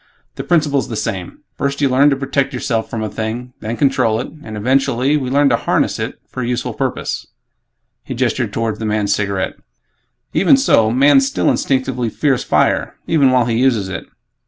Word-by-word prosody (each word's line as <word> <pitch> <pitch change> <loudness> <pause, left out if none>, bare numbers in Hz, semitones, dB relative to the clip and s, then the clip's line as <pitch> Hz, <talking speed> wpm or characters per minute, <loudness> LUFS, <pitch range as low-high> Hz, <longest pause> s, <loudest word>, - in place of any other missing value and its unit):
The - - -6
principle's 150 -5 +1
the 115 - -4
same; 95 -5 -4 0.2
First 140 0 -1
you 145 - +3
learn 135 +3 +4
to 140 - +2
protect 135 0 -1
yourself 115 -2 -2
from 110 -1 -3
a - - -1
thing; 115 +4 -5
then 115 +2 -4
control 115 -5 +2
it; - - -4
and, 110 -1 -7
eventually, 130 +3 +1
we 135 -4 -1
learn 140 +1 +3
to 120 - +3
'harness' - - 0
it - - -4
for 130 - -6
a 120 - -2
useful 125 0 -2
purpose." - - -3 0.8
He - - -6
gestured - - 0
toward 115 -1 -2
the 110 - -3
man's 105 -1 +1
cigarette, 100 -2 -2 0.8
"Even 230 +8 +5
so, 115 - +3
man 135 +3 +5
still 135 0 +1
instinctively 130 -3 -1
fears 135 +2 0
fire - - +1
even 145 -5 +3
while 125 -2 +3
he 115 -1 0
uses 115 -7 +2
it. 95 - -6
125 Hz, 185 wpm, -17 LUFS, 110-140 Hz, 0.8 s, Even